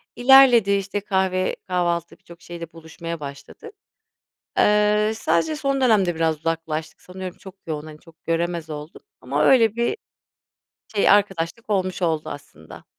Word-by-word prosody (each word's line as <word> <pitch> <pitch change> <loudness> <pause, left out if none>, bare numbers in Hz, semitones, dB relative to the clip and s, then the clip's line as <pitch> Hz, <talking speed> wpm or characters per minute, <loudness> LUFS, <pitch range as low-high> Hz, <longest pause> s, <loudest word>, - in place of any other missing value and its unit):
İlerledi, 245 -5 +6
işte 200 +1 -1
kahve, 190 -2 0
kahvaltı 175 -2 -1
birçok 170 0 -16
şeyle 170 -1 -9
buluşmaya 165 0 -8
başladık. 145 - -10 0.9
Eee, 210 +1 +3
sadece 310 +7 0
son 275 -2 -1
dönemde, 205 -8 +3
biraz 160 -1 0
uzaklaştık, 160 -1 -4
sanıyorum 185 0 -8
çok 190 -2 -12
yoğun, 155 -1 -5
hani, 155 -1 -11
çok 165 -2 -21
göremez 165 -1 -2
olduk, 150 +1 -8 0.2
ama - - -1
öyle 225 -5 +5
bir 235 - 0 1.0
şey, 200 - +3
arkadaşlık 200 +1 +1
olmuş 185 -2 -1
oldu 160 -2 0
aslında. 80 - -11
180 Hz, 135 wpm, -22 LUFS, 165-210 Hz, 1.0 s, İlerledi